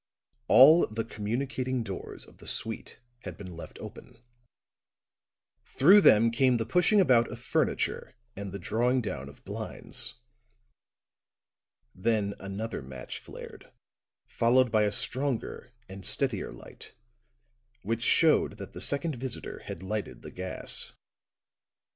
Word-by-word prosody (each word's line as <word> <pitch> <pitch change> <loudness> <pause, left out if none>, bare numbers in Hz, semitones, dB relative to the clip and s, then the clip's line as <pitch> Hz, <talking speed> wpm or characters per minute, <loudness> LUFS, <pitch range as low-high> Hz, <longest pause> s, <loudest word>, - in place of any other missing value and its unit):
All 155 +6 +7
the 110 +1 -4
communicating 125 +3 -3
doors 100 -4 -7
of - - -19
the - - -6
suite - - -2 0.2
had 95 -8 -9
been 90 -4 -9
left 85 - -10
open; - - -11 1.5
through 190 +9 +5
them 115 - +6
came 125 +1 +3
the 115 - -2
pushing 180 - +3
about 125 -10 +4
of - - -8
furniture - - -1 0.2
and 100 -1 -6
the 100 - -5
drawing 125 +5 0
down 70 -9 -5
of 70 - -17
blinds; - - -3 1.8
then 100 0 0
another 100 +4 -5
match 65 -1 -7
flared, - - -12 0.5
followed 125 +1 +2
by 110 -1 +3
a 105 - 0
stronger 130 0 -2 0.2
and 95 0 -10
steadier 120 0 +1
light, - - -12 0.9
which 115 +3 -2
showed 155 -1 +3
that 100 -2 -10
the - - -6
second 140 0 -1
visitor 130 0 -4
had 85 - -7
lighted 105 +2 -5
the - - -9
gas. 95 0 0
115 Hz, 125 wpm, -28 LUFS, 100-130 Hz, 1.8 s, All